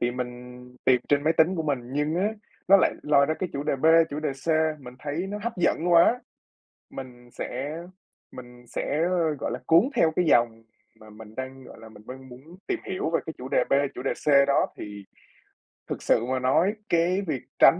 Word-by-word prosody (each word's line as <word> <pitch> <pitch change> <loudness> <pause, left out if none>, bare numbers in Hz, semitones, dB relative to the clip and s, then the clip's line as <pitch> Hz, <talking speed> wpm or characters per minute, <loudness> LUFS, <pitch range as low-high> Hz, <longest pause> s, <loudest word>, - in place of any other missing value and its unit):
Thì 120 - +1
mình 125 0 -3 0.6
tìm 125 -1 +4
trên 145 0 +3
máy 160 - +3
tính 165 +3 +3
của 165 - -2
mình, 145 -4 0
nhưng 150 +2 0
á, 195 +4 +1 0.4
nó 195 - +9
lại - - +2
lôi 140 -1 +4
ra 155 - 0
cái 185 - -4
chủ 140 - -3
đề 150 -2 -1
B, 145 - 0 0.2
chủ 150 +2 -4
đề 155 - -1
C 135 +4 -15 0.3
mình 125 -2 -11
thấy 150 +7 -4
nó 205 - -4
hấp 235 - -2
dẫn 175 0 +1
quá, 200 +9 +5 0.7
mình 125 -2 -10
sẽ 140 +5 -5 0.5
mình 125 -1 -12
sẽ, 150 +5 -2 0.4
gọi - - -3
là, 125 - -4
cuốn 170 +11 +5
theo 160 - +3
cái 180 - +2
dòng 115 -6 +2 0.4
mà 110 0 -15
mình 105 0 -13
đang, 130 0 -7
gọi - - -13
là, 115 - -12
mình 105 -1 -16
đang 130 0 -10
muốn 145 +9 -14
tìm 370 -4 -1
hiểu 185 -4 -2
về 165 - +1
cái 160 - -5
chủ 130 +1 -8
đề - - +2
B, - - +2 0.2
chủ 125 - -6
đề 135 - 0
C 140 -2 +3
đó. 140 - +3
Thì 105 -1 -8 0.8
thực - - -5
sự 115 - +2
mà 130 +1 -1
nói 160 +10 +2 0.2
cái 175 +3 +2
việc 140 -5 -2 0.2
tránh 165 +6 +7
140 Hz, 215 wpm, -26 LUFS, 125-165 Hz, 0.8 s, nó